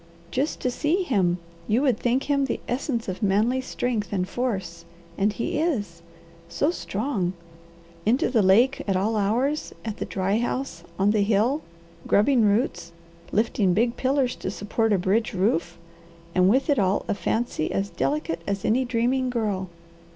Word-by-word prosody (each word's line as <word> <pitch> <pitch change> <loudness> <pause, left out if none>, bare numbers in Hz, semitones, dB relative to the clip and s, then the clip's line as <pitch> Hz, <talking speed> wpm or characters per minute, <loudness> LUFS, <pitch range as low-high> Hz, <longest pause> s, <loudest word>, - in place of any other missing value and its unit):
"Just 275 +4 -1
to 250 - 0
see 320 +9 +1
him, 190 - +1 0.3
you 230 +6 +2
would 255 -6 +2
think 250 +3 +1
him 280 -1 +1
the 260 - -2
essence 245 -2 -2
of 185 +2 -4
manly 215 +6 +2
strength 245 -4 -2
and 185 -2 -1
force. 195 -7 -3 0.3
And 200 +4 +2
he 230 +7 -2
is! 205 - -1 0.5
So 290 - +1
strong! 205 - -2 0.7
Into 245 +5 +2
the 230 -4 +4
lake 225 +8 +4
at 195 - +1
all 205 +4 +1
hours, 240 +9 0
at 220 -1 -4
the - - -3
dry 195 +3 0
house, 255 +3 -3
on 195 +2 +3
the 215 -1 +2
hill, 220 +8 +2 0.5
grubbing 240 +5 +4
roots, 205 -5 0 0.4
lifting 205 -4 +2
big 235 +3 +2
pillars 265 -1 +1
to - - -4
support 215 +3 -1
a 200 - +4
bridge 205 +5 0
roof, 175 -3 0 0.6
and 185 0 +4
with 260 +6 +3
it 280 - +2
all 195 0 +1
a - - +1
fancy 220 -5 -1
as 195 +1 -1
delicate 225 - -1
as 200 -1 -2
any 250 +4 +3
dreaming 250 +2 0
girl. 205 -6 -2
220 Hz, 165 wpm, -25 LUFS, 195-255 Hz, 0.7 s, the